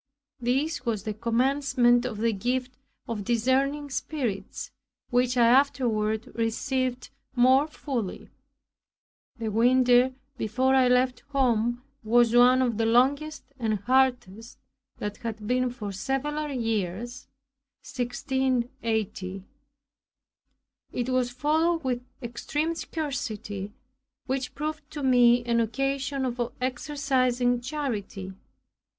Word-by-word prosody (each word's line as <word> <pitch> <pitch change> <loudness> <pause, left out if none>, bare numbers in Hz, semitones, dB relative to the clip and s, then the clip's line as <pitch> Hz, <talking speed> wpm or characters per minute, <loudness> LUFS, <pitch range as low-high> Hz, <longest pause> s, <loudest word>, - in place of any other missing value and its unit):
This 270 +7 0
was 220 -5 -2
the 215 -1 -3
commencement 245 +1 +2
of 220 - -5
the 230 +1 +1
gift 250 +5 -2 0.3
of 220 -3 -3
discerning 270 +6 +1
spirits, 250 -9 -3 0.4
which 250 0 +2
I 235 - +6
afterward 230 -4 +2
received 250 +2 -1 0.2
more 260 +4 +5
fully. 260 -10 -5 1.1
The 225 -1 -3
winter 250 +2 +4 0.2
before 255 +5 +1
I 260 -1 +5
left 250 0 +2
home 240 -3 +1 0.2
was 235 +1 +4
one 250 +1 +6
of 235 -3 -1
the 225 - +2
longest 280 +6 +2 0.2
and 220 -3 0
hardest 235 -1 0 0.4
that 210 0 -4
had 220 -2 -6
been 250 +2 +1
for 220 -5 -6
several 285 +8 -2
years 230 -1 -3 0.6
(1680). 240 -6 -2 1.5
It 245 0 -2
was 255 -1 +1
followed 315 +6 +1
with 250 -2 -1 0.2
extreme 295 +7 -2
scarcity, 220 - -4 0.5
which 265 -1 -3
proved 305 +1 -4
to 295 -2 -6
me 245 -2 +5
an 235 -1 +2
occasion 270 +3 -1
of 245 -1 -2 0.2
exercising 255 -2 0
charity. 225 -8 -4
245 Hz, 105 wpm, -27 LUFS, 230-265 Hz, 1.5 s, I